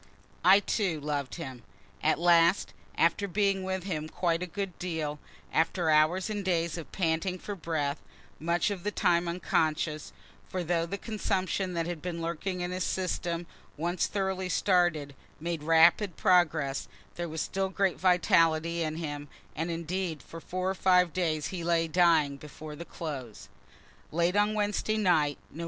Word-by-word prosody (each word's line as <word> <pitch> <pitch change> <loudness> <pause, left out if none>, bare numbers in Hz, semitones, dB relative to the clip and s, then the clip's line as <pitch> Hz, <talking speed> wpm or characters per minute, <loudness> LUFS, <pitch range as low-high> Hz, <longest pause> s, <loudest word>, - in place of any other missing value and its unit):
I, 190 +3 +7
too, 190 -7 0
loved 145 -2 -3
him. 130 -8 -7 0.4
At - - +2
last, 170 +2 +4 0.2
after 170 +4 +2
being 195 0 +1
with 190 -1 -2
him 155 -5 -3
quite 170 -1 0
a 180 - -3
good 195 -1 -5
deal 160 -4 -3 0.3
after 165 0 +2
hours 155 +5 +3
and 210 -2 -3
days 170 -3 0
of 165 - -8
panting 175 +1 0
for 205 - -6
breath, 160 -5 -2 0.4
much 170 +4 +1
of 195 -3 -4
the 210 - 0
time 175 -3 +2
unconscious, 155 -3 -1 0.4
(for 185 -1 -2
though 170 0 0
the 200 - -3
consumption 195 -3 -2
that 165 -1 0
had 170 -2 -4
been 175 -2 -4
lurking 170 +3 -3
in 175 0 -2
his 185 0 -2
system, 175 -2 -2 0.3
once 175 +3 0
thoroughly 190 -2 -2
started, 175 -7 +2 0.3
made 165 0 -3
rapid 165 +4 +4
progress, 160 -7 +2 0.3
there 170 -1 -4
was 160 +1 -5
still 195 0 -1
great 195 -1 0
vitality 170 -2 +3
in 155 -1 -1
him, 145 -3 -5 0.3
and 165 +3 -2
indeed 170 -1 -3
for 165 - -10
four 185 +2 -3
or 190 - +1
five 180 -3 +3
days 160 -5 0
he 175 -2 -4
lay 165 -1 +2
dying, 160 -4 +3
before 150 +1 -9
the 170 - -8
close,) 135 -12 -7 0.6
late 170 +3 +1
on 210 +1 +3
Wednesday 210 +1 0
night, 160 -8 +2
Nov. 155 - -11
170 Hz, 160 wpm, -29 LUFS, 160-185 Hz, 0.6 s, I